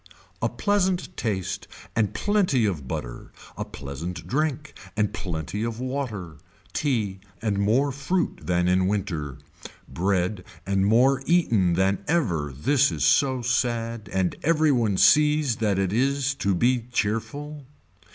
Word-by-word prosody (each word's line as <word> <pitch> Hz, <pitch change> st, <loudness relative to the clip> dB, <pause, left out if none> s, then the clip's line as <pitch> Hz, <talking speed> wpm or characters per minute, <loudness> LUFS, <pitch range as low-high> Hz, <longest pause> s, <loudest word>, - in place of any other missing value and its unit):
A -, -, +1 dB
pleasant 190 Hz, -3 st, 0 dB
taste 100 Hz, -5 st, -3 dB, 0.3 s
and 110 Hz, -3 st, +2 dB
plenty 185 Hz, -, +2 dB
of 80 Hz, -10 st, -2 dB
butter, -, -, -6 dB, 0.2 s
a -, -, -3 dB
pleasant 75 Hz, +7 st, -7 dB
drink 150 Hz, +1 st, -1 dB, 0.2 s
and 105 Hz, -1 st, +1 dB
plenty 90 Hz, 0 st, -4 dB
of 115 Hz, 0 st, -3 dB
water, 120 Hz, -, -4 dB, 0.3 s
tea 110 Hz, -10 st, -1 dB, 0.2 s
and 105 Hz, -3 st, -1 dB
more 120 Hz, +8 st, +2 dB
fruit 155 Hz, +7 st, -1 dB
than 90 Hz, 0 st, +1 dB
in 90 Hz, 0 st, +3 dB
winter, 85 Hz, -9 st, -2 dB, 0.5 s
bread 95 Hz, +1 st, -1 dB, 0.2 s
and 100 Hz, 0 st, +1 dB
more 130 Hz, +5 st, +4 dB
eaten 115 Hz, -, +3 dB
than 95 Hz, +2 st, +1 dB
ever 90 Hz, -, 0 dB
this 140 Hz, -, +2 dB
is -, -, -2 dB
so 130 Hz, -3 st, +3 dB
sad 115 Hz, -3 st, -1 dB
and 95 Hz, -2 st, 0 dB
every 155 Hz, -1 st, +3 dB
one 115 Hz, -7 st, +1 dB
sees 150 Hz, -3 st, +4 dB
that 105 Hz, -4 st, +1 dB
it 95 Hz, 0 st, 0 dB
is 135 Hz, +3 st, +1 dB
to 100 Hz, -8 st, 0 dB
be 120 Hz, +4 st, +1 dB
cheerful. 140 Hz, +6 st, -3 dB
115 Hz, 135 wpm, -25 LUFS, 95-140 Hz, 0.5 s, more